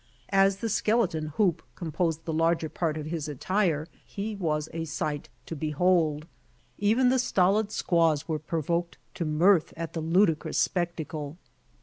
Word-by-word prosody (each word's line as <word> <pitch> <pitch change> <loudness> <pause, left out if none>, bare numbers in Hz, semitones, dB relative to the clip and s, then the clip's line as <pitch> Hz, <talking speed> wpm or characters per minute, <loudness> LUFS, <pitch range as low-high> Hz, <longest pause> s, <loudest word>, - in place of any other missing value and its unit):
As 195 0 +4
the 230 - -6
skek^ton 190 -8 0
hoop 175 -6 +2
composed 165 -1 -2
the 160 - -2
larger 165 0 +1
part 160 -2 -2
of 150 - -5
his 155 -1 -3
attire 160 +1 0 0.2
he 210 +2 -5
was 155 -5 -1
a 165 0 -3
sight 150 -1 -3 0.2
to 165 - -6
behold. 155 0 +1 0.5
Even 225 +5 +3
the 260 +1 +3
stolid 200 -1 +2
squaws 165 -6 +1
were 155 -2 -1
provoked 170 +2 -2 0.2
to 170 - -3
mirth 165 +3 +3
at 165 -1 -5
the 165 - -3
ludicrous 165 0 +2
spectacle. 165 -4 -2
165 Hz, 145 wpm, -27 LUFS, 155-190 Hz, 0.5 s, As